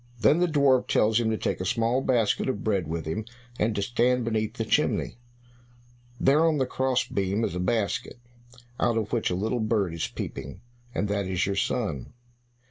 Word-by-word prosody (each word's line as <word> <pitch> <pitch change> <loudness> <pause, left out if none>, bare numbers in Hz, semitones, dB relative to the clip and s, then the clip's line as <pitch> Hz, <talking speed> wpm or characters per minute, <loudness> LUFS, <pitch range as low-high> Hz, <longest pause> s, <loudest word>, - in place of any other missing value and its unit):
Then 150 +7 +4
the 180 - +3
dwarf 140 -5 +3
tells 110 +2 +3
him 115 -2 +1
to 110 - 0
take - - -2
a - - -1
small 115 +5 +1
basket 120 -3 +1
of 105 - -3
bread 100 -6 0
with 80 0 -3
him, 90 +8 -3 0.4
and 110 0 +1
to 100 - 0
stand 120 +2 +1
beneath 110 -1 -1
the 115 - -2
chimney. 110 - 0 1.0
"There 145 +4 +4
on 160 -2 +3
the 130 - +1
cross 130 0 0
beam 100 +3 -1
is 85 - -1
a 90 - -3
basket, 115 +7 -1 0.6
out 115 - +2
of 110 -1 -2
which 115 - +1
a 90 - -1
little 110 +6 -1
bird 105 -5 0
is 85 - -2
peeping, 70 - -7 0.3
and 105 - 0
that 100 -1 -1
is 95 -2 0
your 100 - -1
son." 100 - -2
110 Hz, 195 wpm, -26 LUFS, 100-125 Hz, 1.0 s, Then